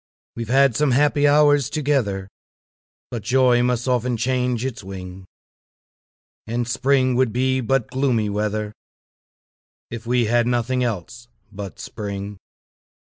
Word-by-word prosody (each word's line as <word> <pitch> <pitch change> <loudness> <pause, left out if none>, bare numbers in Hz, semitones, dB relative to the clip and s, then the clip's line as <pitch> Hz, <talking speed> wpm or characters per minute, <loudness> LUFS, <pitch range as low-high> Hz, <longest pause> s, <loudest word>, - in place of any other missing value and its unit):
We've 115 -1 -5
had 135 -1 +4
some 150 -4 +2
happy 145 +2 +3
hours 145 -2 +4
together, 130 -11 -1 0.8
But 120 - -4
joy 125 +1 +3
must 125 0 0
often 125 -1 0
change 125 0 0
its 130 -6 -5
wing; 95 -1 -9 1.2
And 120 +1 -2
spring 130 +1 +2
would 125 -2 +2
be 130 +2 +1
but 130 0 0
gloomy 130 -5 +1
weather, 105 +1 -2 1.2
If 115 0 -7
we 120 -1 +2
had 120 +2 +2
nothing 125 +1 0
else 115 +1 -4 0.2
but 100 -5 -8
spring. 100 -1 -6
120 Hz, 125 wpm, -22 LUFS, 110-130 Hz, 1.2 s, had